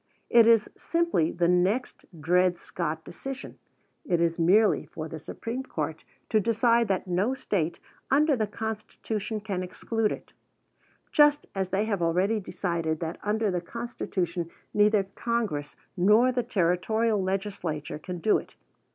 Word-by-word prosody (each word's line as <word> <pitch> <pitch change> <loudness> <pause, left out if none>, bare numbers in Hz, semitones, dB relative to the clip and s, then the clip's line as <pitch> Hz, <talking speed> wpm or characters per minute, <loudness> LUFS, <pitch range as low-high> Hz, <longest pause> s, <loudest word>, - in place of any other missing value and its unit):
It 230 -1 +7
is 230 -2 +5
simply 335 - +1
the 170 0 +1
next 185 +8 +1
Dred 180 +2 +3
Scott 160 -2 -4
decision. 270 +9 -7 0.4
It 175 - +1
is 170 0 +1
merely 200 +6 +4
for 155 -1 -6
the 160 0 -7
Supreme 230 - -5
Court 265 - -4 0.3
to 220 - +4
decide 230 +2 +3
that 195 -1 0
no 190 +8 0
State 175 - -1 0.3
under 290 +2 +4
the 220 -3 0
Constitution 220 0 -4
can 200 -3 -3
exclude 215 +4 -1
it, - - -7 0.8
just 295 0 +5
as 190 -2 -2
they 195 +3 +1
have 200 -5 -1
already 185 +6 +2
decided 170 -4 -2
that 165 -1 -4
under 210 0 0
the 180 -1 -1
Constitution 180 -5 -3 0.2
neither 210 -1 +4
Congress 200 -8 -3 0.2
nor 210 +7 +5
the 250 0 0
Territorial 215 +1 +1
legislature 185 -6 -3
can 180 +3 -6
do 210 +6 +3
it. - - -14
200 Hz, 145 wpm, -27 LUFS, 175-225 Hz, 0.8 s, It